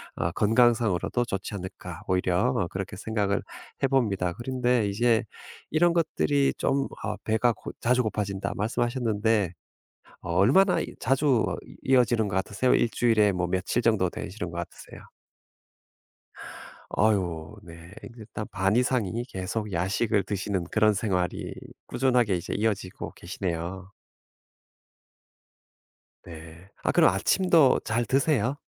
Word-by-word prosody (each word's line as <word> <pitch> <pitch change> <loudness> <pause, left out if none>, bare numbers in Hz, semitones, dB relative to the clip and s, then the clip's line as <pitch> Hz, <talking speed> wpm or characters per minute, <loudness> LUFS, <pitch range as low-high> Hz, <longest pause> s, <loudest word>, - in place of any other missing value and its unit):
어 85 +1 -1
건강상으로도 115 0 +2
좋지 95 -2 -4
않을까, 95 -1 -8
오히려 90 +6 +1
어 90 -7 0
그렇게 100 +2 -5
생각을 100 -1 -1 0.4
해봅니다. 105 -10 +1
그런데 125 -1 0
이제 115 +2 +2 0.5
이런 170 +2 +3
것들이 145 -4 +1
좀 135 0 0 0.2
아 105 - -2
"배가 115 +2 +2
고 - - -9
자주 125 +2 +2
고파진다." 100 -3 -2
말씀하셨는데 110 -3 0 0.7
어 85 - -4
얼마나 185 - +4
이 - - -5
자주 135 -3 +2
어 - - -3 0.3
이어지는 120 -4 +3
것 95 - -3
같으세요? 100 +6 +1
1 120 - +2
주일에 110 -3 +3
뭐 90 -1 -1
며칠 95 +6 -1
정도 110 -6 +2
되시는 90 -1 -6
것 85 - -7
같으세요? 85 - -9 1.9
아유 95 -4 0
네. 85 -1 -13
이제 115 -3 -11
딱 105 - -5
반 95 +3 +1
이상이 120 -3 0
계속 105 0 -4
야식을 95 +4 0
드시는 95 -2 -2
그런 110 +3 +3
생활이 95 -5 -2 0.3
꾸준하게 120 -6 +2
이제 85 - -4
이어지고 105 -4 -2
계시네요. 90 +1 -5 2.3
네. 85 +2 -12
아 - - +2
그럼 - - +5
아침도 160 - +4
잘 115 +2 0
드세요? 135 -2 +1
105 Hz, 280 characters per minute, -26 LUFS, 95-120 Hz, 2.3 s, 그럼